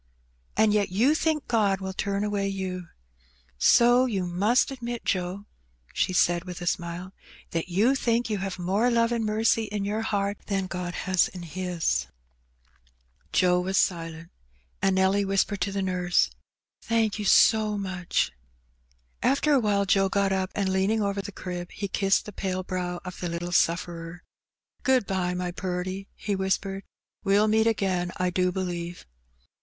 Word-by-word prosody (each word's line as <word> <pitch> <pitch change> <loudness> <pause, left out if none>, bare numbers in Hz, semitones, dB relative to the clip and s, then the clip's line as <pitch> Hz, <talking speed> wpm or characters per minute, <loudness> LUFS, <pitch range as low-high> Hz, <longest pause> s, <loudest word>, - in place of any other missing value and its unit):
And 215 -1 +4
yet 205 -1 +2
you 230 +11 +3
think 315 -1 0
God 205 -5 +2
will 190 0 -5
turn 200 +1 -1
away 205 -1 -1
you. 185 -2 -4 0.7
So 240 - +5
you 195 -6 -1
must 205 +10 +2
admit, 240 -3 -5
Joe, 185 +1 -2 0.5
she - - +1
said 175 -1 +2
with 180 -1 -7
a 175 - -6
smile, 175 +1 -3 0.2
'' - - -22
that 165 +1 -2
you 210 +9 +3
think 240 -3 +1
you 210 -3 -2
have 190 -1 -4
more 195 +7 +1
love 230 -1 +2
and 235 -1 0
mercy 220 +1 +2
in 205 -1 -3
your 210 +2 -1
heart 200 -2 -1
than 195 -2 0
God 180 -1 -4
has 185 -2 +3
in 180 -1 -9
His? 175 +1 -1 0.6
*' - - -38
Joe 180 -1 +3
was 190 +1 -1
silent. 165 -1 -1 0.5
And 195 -1 +2
Nelly 190 +2 +3
whispered 195 0 0
to 195 +2 0
the 195 0 -2
nurse, 180 -1 +1 0.5
"Thank 225 -2 0
you 210 - -3
so 215 +1 +5
much. 185 -3 -1 0.9
After 280 +2 +2
awhile 210 -6 +2
Joe 195 0 +3
got 200 0 +1
up, 190 -1 -1
and 200 -2 0
leaning 205 +3 +1
over 200 0 -1
the 200 +1 -7
crib, 180 -2 -6
he 200 - -4
kissed 195 +1 +1
the 210 - -8
pale 185 -1 -2
brow 180 -1 -3
of 180 - -7
the 175 - -3
little 170 +1 -4
sufferer. 170 0 0 0.3
" - - -49
Good 260 -5 +3
bye, 180 -2 -1
my 180 0 -2
purty, 185 +2 -4
he 205 -1 -2
whispered. 195 0 -2 0.4
"We*ll 205 +2 +3
meet 220 +1 +3
again, 185 -5 0
I 180 -1 0
do 180 0 +1
believe." 175 -2 -4
195 Hz, 170 wpm, -26 LUFS, 180-210 Hz, 0.9 s, So